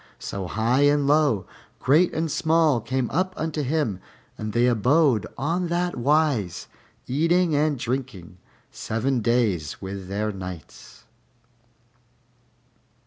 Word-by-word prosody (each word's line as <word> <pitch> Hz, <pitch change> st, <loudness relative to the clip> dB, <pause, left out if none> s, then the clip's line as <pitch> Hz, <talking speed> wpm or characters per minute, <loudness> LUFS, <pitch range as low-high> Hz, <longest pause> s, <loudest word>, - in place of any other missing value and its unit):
So 95 Hz, -2 st, -5 dB
high 115 Hz, +7 st, +1 dB
and 145 Hz, 0 st, +3 dB
low, 145 Hz, -8 st, +2 dB, 0.3 s
great 155 Hz, +7 st, +3 dB
and 160 Hz, -1 st, -2 dB
small, 160 Hz, -6 st, +2 dB
came 130 Hz, +2 st, -1 dB
up 185 Hz, +4 st, -1 dB
unto 160 Hz, -1 st, -2 dB
him, 140 Hz, -, -1 dB, 0.4 s
and 110 Hz, 0 st, -5 dB
they 120 Hz, +3 st, +2 dB
abode 125 Hz, +1 st, +3 dB
on 170 Hz, +7 st, -1 dB
that 175 Hz, +1 st, -1 dB
wise, 135 Hz, -, +1 dB, 0.4 s
eating 165 Hz, +5 st, +2 dB
and 150 Hz, 0 st, +1 dB
drinking, 115 Hz, -9 st, -5 dB, 0.3 s
seven 120 Hz, +3 st, -2 dB
days 105 Hz, -10 st, 0 dB
with 95 Hz, -1 st, -7 dB
their 105 Hz, +2 st, -2 dB
nights. 90 Hz, -5 st, -10 dB
130 Hz, 115 wpm, -24 LUFS, 105-155 Hz, 0.4 s, and